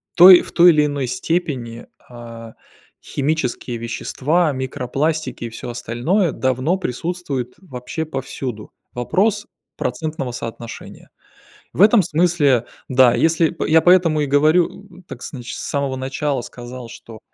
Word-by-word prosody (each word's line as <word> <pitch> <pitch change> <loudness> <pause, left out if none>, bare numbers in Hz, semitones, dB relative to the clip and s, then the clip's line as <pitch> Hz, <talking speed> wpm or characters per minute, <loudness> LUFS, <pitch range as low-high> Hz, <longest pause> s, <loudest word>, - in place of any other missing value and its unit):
той 180 +1 +10
в - - -11
той 175 0 +7
или 150 -2 +3
иной 145 -3 -2
степени, 125 -5 -3 0.2
а, 115 -2 -11 0.5
химические 135 -4 -2
вещества, 145 +8 -1
микропластики 130 +1 -3
и 115 - -5
всё 115 - -8
остальное, 125 - -1
давно 130 +7 0
присутствует 140 -5 -4
вообще 160 -1 -6
повсюду. 135 -6 -6 0.2
Вопрос 200 - 0 0.3
процентного 135 0 -3
соотношения. 115 -1 -8 0.6
В - - -1
этом 215 +1 +6
смысле, 155 -7 +2 0.2
да. 130 -2 +5
Если, 165 0 +2
п 170 - -4
я 160 +1 +5
поэтому 175 -4 +4
и - - +1
говорю, 165 +7 +1
так 125 - -9
значит, 125 -2 -7
с - - -6
самого 140 -2 -2
начала 135 +1 -2
сказал, 120 0 -9
что 115 -1 -12
140 Hz, 130 wpm, -20 LUFS, 125-165 Hz, 0.6 s, той